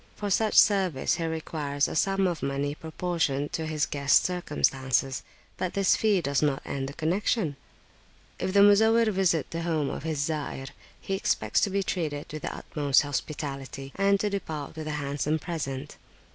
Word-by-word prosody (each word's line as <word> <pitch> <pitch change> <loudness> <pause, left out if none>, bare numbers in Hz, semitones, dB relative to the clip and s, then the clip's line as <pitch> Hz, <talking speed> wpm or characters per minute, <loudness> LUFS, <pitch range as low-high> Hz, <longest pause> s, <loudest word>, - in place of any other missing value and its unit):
For 205 -1 -3
such 215 +2 +2
service 185 -7 +4
he 165 - -2
requires 150 -3 -1
a - - -5
sum 195 +3 +2
of 175 -4 -1
money 140 +1 -1
proportioned 160 -3 -2
to 160 -1 -2
his 155 -1 0
guests' 140 -1 +3
circumstances, 135 -6 0 0.4
but 185 - -3
this 195 -2 +4
fee 210 -4 +2
does 140 -3 0
not 145 -3 +1
end 135 -1 -3
the - - -8
connexion. 165 - 0 0.8
If - - -1
the 200 +1 +5
Muzawwir 220 +2 +5
visit 185 -6 +1
the 165 - -3
home 160 -4 0
of - - -5
his 160 -1 -3
Zair, 145 -4 -4 0.3
he 195 - -4
expects 195 - +1
to 205 - +2
be 195 0 0
treated 155 -6 -2
with 155 - -5
the - - -3
utmost 145 -2 +2
hospitality, 140 -2 -5
and 200 0 +3
to 210 - 0
depart 160 -7 -4
with 155 -1 -6
a 150 -1 -2
handsome 145 +2 -1
present. 145 -4 -5
155 Hz, 175 wpm, -27 LUFS, 140-190 Hz, 0.8 s, the